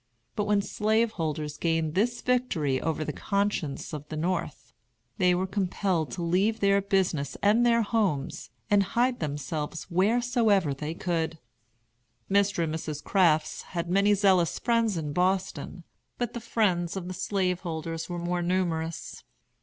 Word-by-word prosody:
But 210 - 0
when 205 -1 +2
slaveholders 185 -10 -1
gained 165 -2 0
this 235 +6 0
victory 175 - +1
over 155 -1 -1
the - - -3
conscience 200 -9 -2
of 150 0 -7
the 155 - -4
North, 170 -2 -3 0.5
they 180 -1 +4
were 185 +1 0
compelled 185 -3 -1
to 175 - -4
leave 195 +6 +1
their 200 0 +3
business 185 -8 0
and 215 +4 +4
their 235 -1 +4
homes, 200 -11 -1 0.2
and 205 -1 +6 0.2
hide 245 +1 +2
themselves 150 +3 -4
wheresoever 210 - +2
they 150 +4 -5
could. 165 -2 -2 0.9
Mr. 200 -3 +3
and 155 -1 -2
Mrs. 155 -2 -4
Crafts 165 -6 +2 0.2
had 170 +1 -2
many 200 +2 +4
zealous 185 -6 +3
friends 230 -5 +1
in 150 -3 -3
Boston, 180 0 -1 0.3
but 240 -2 -2
the 235 - -5
friends 195 -7 0
of 180 -2 -5
the 185 - -4
slaveholders 175 -4 -2
were 175 - -3
more 175 +1 -1
numerous. 170 -2 -2
180 Hz, 145 wpm, -27 LUFS, 160-205 Hz, 0.9 s, and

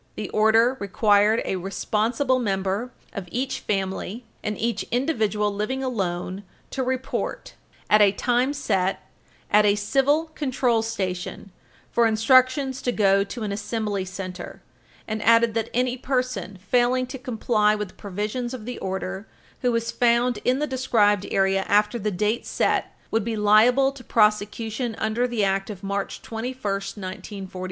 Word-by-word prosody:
The 210 - -5
order 225 +4 +4
required 210 +2 +3
a 190 - -1
responsible 225 +8 0
member 195 +2 -1 0.2
of 190 -4 -6
each 265 +2 -2
family 195 +3 -3 0.2
and 210 0 -3
each 225 -2 -1
individual 215 -6 0
living 255 +7 -2
alone 190 -6 -2 0.3
to 265 - -2
report, 260 0 -3 0.3
at 210 0 +5
a 200 -1 +6
time 245 +5 +1
set, 195 -9 -1 0.4
at 210 0 +6
a 205 -1 +4
Civil 280 +9 +1
Control 255 -6 +1
Station 195 -3 -4 0.4
for 235 -1 +4
instructions 255 +4 +3
to 245 - 0
go 195 -3 +3
to 230 +3 -6
an 210 - -2
Assembly 205 -1 -2
Center, 185 0 -7 0.4
and 215 0 -3
added 230 0 +4
that 225 0 -1
any 250 +1 0
person 250 -8 -2
failing 245 +6 +1
to 260 +1 -8
comply 220 -3 +1
with 210 -2 -4
the - - -17
provisions 210 +6 -4
of 220 -4 -9
the 245 +1 -5
order 190 +1 -4 0.3
who 250 - +2
was 230 0 -1
found 240 0 +2
in 255 +1 +2
the 300 - 0
described 225 -7 +2
area 195 0 +2
after 210 +3 +2
the 210 0 -1
date 210 +4 -1
set - - 0 0.2
would 225 -1 +1
be 230 +1 -2
liable 225 +6 +5
to 275 -2 -12
prosecution 220 +2 +1
under 225 +3 0
the 235 -4 -1
Act 195 +1 0
of 200 -2 -8
March 200 0 -3
21, 235 +3 -5
1942, 195 0 -4
supra. 185 - -9
220 Hz, 155 wpm, -24 LUFS, 200-250 Hz, 0.4 s, a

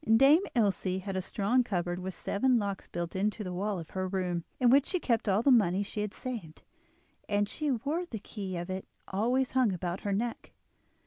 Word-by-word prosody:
Dame 285 +7 +7
Ilse 195 -4 +1
had 195 -1 -4
a 190 - 0
strong 210 +7 +1
cupboard 175 -5 -2
with 185 0 -5
seven 255 +4 +2
locks 200 -3 -3
built 170 0 -4
into 210 +3 0
the 180 -2 -4
wall 200 +2 -1
of 165 -2 -8
her 185 0 -2
room, 180 -3 -1 0.2
in 245 -2 +5
which 275 +1 +5
she 365 - 0
kept 230 -8 +1
all 200 +4 +3
the 275 - +5
money 200 -5 +4
she 210 +1 -4
had 210 -1 -2
saved, 220 -12 -6 0.7
and 205 0 +2
she 300 +7 -2
wore 285 +8 -1
the 230 - -5
key 195 -3 -6
of 175 0 -4
it 185 0 -4 0.2
always 245 +7 +1
hung 255 -5 +3
about 180 +1 -3
her 205 - -3
neck. 230 +4 -3
205 Hz, 205 wpm, -30 LUFS, 185-245 Hz, 0.7 s, Dame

